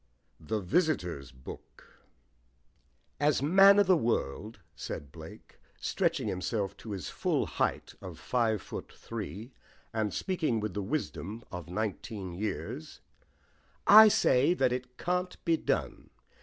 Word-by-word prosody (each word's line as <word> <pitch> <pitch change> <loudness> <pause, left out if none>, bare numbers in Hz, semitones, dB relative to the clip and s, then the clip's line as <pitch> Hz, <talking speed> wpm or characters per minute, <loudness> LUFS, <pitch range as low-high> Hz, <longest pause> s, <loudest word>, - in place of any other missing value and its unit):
THE 80 +8 -2
VISITORS' 90 - 0
BOOK 65 0 -13 1.2
"As 145 -2 +2
man 195 +6 +7
of 205 - +6
the 185 0 +5
world," 110 - -1 0.2
said 70 -2 -6
Blake, - - -12 0.2
stretching - - 0
himself 100 +1 -2
to 115 - -10
his 100 -3 -5
full - - 0
height - - -2
of - - -8
five 115 -5 0
foot - - -7
three, 115 +2 -7 0.4
and 110 -2 0
speaking 160 - -1
with 105 -3 -3
the 105 - -2
wisdom 100 - -4
of 90 -2 -7
nineteen 100 -1 -4
years, 85 -5 -5 0.8
"I 220 +2 +10
say 145 -5 +3
that 125 - +2
it 125 0 -6
can't 180 +1 -2
be 165 - +4
done. - - -2
110 Hz, 130 wpm, -30 LUFS, 90-150 Hz, 1.2 s, I